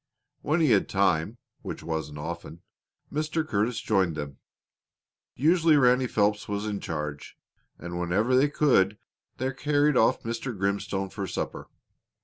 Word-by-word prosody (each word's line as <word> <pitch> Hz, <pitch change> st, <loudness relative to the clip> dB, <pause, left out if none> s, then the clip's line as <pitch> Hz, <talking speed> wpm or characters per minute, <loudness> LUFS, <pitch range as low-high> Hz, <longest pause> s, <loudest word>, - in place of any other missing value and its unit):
When 155 Hz, +3 st, +1 dB
he 150 Hz, -6 st, +4 dB
had 100 Hz, -3 st, +3 dB
time, 95 Hz, +2 st, +1 dB, 0.2 s
which -, -, -7 dB
wasn't 80 Hz, -2 st, -4 dB
often, 85 Hz, +1 st, -7 dB, 0.5 s
Mr. 155 Hz, +1 st, -1 dB
Curtis 110 Hz, -1 st, 0 dB
joined 95 Hz, -6 st, +1 dB
them. 75 Hz, -2 st, -6 dB, 1.0 s
Usually 160 Hz, +2 st, +4 dB
Ranny 125 Hz, -1 st, +4 dB
Phelps 105 Hz, -2 st, +1 dB
was 105 Hz, 0 st, -3 dB
in 105 Hz, -2 st, -2 dB
charge, 75 Hz, -4 st, -5 dB, 0.4 s
and 85 Hz, 0 st, -6 dB
whenever 100 Hz, +9 st, +1 dB
they 140 Hz, +3 st, +4 dB
could 105 Hz, -10 st, +3 dB, 0.4 s
they 130 Hz, +1 st, -2 dB
carried 145 Hz, +1 st, +2 dB
off 110 Hz, -, +3 dB
Mr. 115 Hz, 0 st, -4 dB
Grimstone 95 Hz, 0 st, -2 dB
for 100 Hz, -1 st, -4 dB
supper. -, -, -5 dB
105 Hz, 135 wpm, -27 LUFS, 85-130 Hz, 1.0 s, he